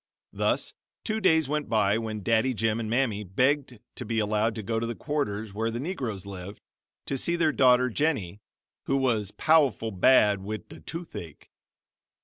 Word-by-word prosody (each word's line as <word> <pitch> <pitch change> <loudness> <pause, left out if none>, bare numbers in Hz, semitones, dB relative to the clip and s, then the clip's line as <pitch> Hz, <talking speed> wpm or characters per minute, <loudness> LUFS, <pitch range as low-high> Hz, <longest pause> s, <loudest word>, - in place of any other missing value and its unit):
Thus - - 0 0.3
two 220 0 -1
days 160 -6 +4
went 150 -3 -2
by, 105 -1 +2
when 110 -2 -5
Daddy 115 +4 +2
Jim 110 +1 0
and 110 -2 -3
Mammy 115 -4 0
begged 130 +6 0 0.2
to - - -7
be 115 0 -3
allowed 110 +1 +1
to 110 - -5
go 115 +2 -1
to 115 - -2
the 120 - -4
quarters 110 -9 -3
where 110 +2 -1
the 115 +1 -4
Negroes 125 - -4
lived, 100 0 -8 0.5
to 135 - -2
see 170 - 0
their 165 -2 +2
daughter, 125 -2 +4
"Jennie, 120 - -1 0.5
who 135 - +1
was 115 -7 +1
pow'ful 140 -6 +2
bad 105 0 +4
wid 105 +2 -6
the - - -11
toothache." 160 - -9
115 Hz, 170 wpm, -27 LUFS, 105-135 Hz, 0.5 s, days